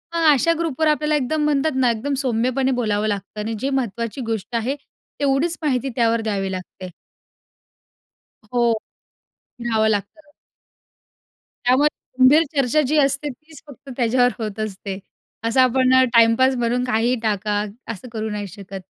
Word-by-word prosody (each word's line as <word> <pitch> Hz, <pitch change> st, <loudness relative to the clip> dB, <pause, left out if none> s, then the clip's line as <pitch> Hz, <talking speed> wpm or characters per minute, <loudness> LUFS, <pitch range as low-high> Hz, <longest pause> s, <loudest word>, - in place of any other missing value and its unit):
मग 330 Hz, -, +1 dB
अशा 335 Hz, +5 st, +2 dB
ग्रुपवर 315 Hz, -1 st, 0 dB
आपल्याला 300 Hz, 0 st, +2 dB
एकदम, 300 Hz, +2 st, 0 dB
म्हणतात 300 Hz, +1 st, +1 dB
ना, 260 Hz, -2 st, +3 dB
एकदम 240 Hz, +6 st, -3 dB
सौम्यपणे 255 Hz, +2 st, +1 dB
बोलावं 215 Hz, -1 st, 0 dB
लागतं 205 Hz, +1 st, -4 dB
आणि 225 Hz, +2 st, -3 dB
जे 270 Hz, -, -1 dB
महत्त्वाची 235 Hz, -2 st, -2 dB
गोष्ट 225 Hz, +2 st, -4 dB
आहे 235 Hz, +4 st, -1 dB, 0.4 s
तेवढीच 285 Hz, +4 st, +1 dB
माहिती 270 Hz, -3 st, 0 dB
त्यावर 230 Hz, -2 st, +2 dB
द्यावी 195 Hz, -3 st, -2 dB
लागते. 185 Hz, 0 st, -7 dB, 1.6 s
हो. 245 Hz, -, +2 dB, 1.0 s
रहाव 225 Hz, -2 st, +1 dB
लागतं. 220 Hz, -, -3 dB, 1.3 s
त्यामुळे 260 Hz, +4 st, +4 dB, 0.3 s
गंभीर 290 Hz, +5 st, +7 dB
चर्चा 275 Hz, +2 st, +2 dB
जी 305 Hz, +3 st, +1 dB
असते 275 Hz, +1 st, +1 dB
तीच 305 Hz, +3 st, -13 dB
फक्त 280 Hz, 0 st, -13 dB
त्याच्यावर 245 Hz, 0 st, +3 dB
होत 215 Hz, -1 st, -5 dB
असते. 195 Hz, -1 st, -6 dB, 0.4 s
असं 230 Hz, +3 st, +3 dB
आपण 255 Hz, 0 st, +3 dB
अ, 260 Hz, -, +6 dB
टाईमपास 230 Hz, +3 st, +5 dB
म्हणून 245 Hz, +1 st, 0 dB
काहीही 240 Hz, +1 st, +1 dB
टाका, 210 Hz, -1 st, 0 dB, 0.3 s
असं 230 Hz, +3 st, -9 dB
करू 220 Hz, -1 st, -3 dB
नाही 210 Hz, -1 st, -4 dB
शकत. 195 Hz, 0 st, -9 dB
245 Hz, 140 wpm, -21 LUFS, 220-275 Hz, 1.6 s, गंभीर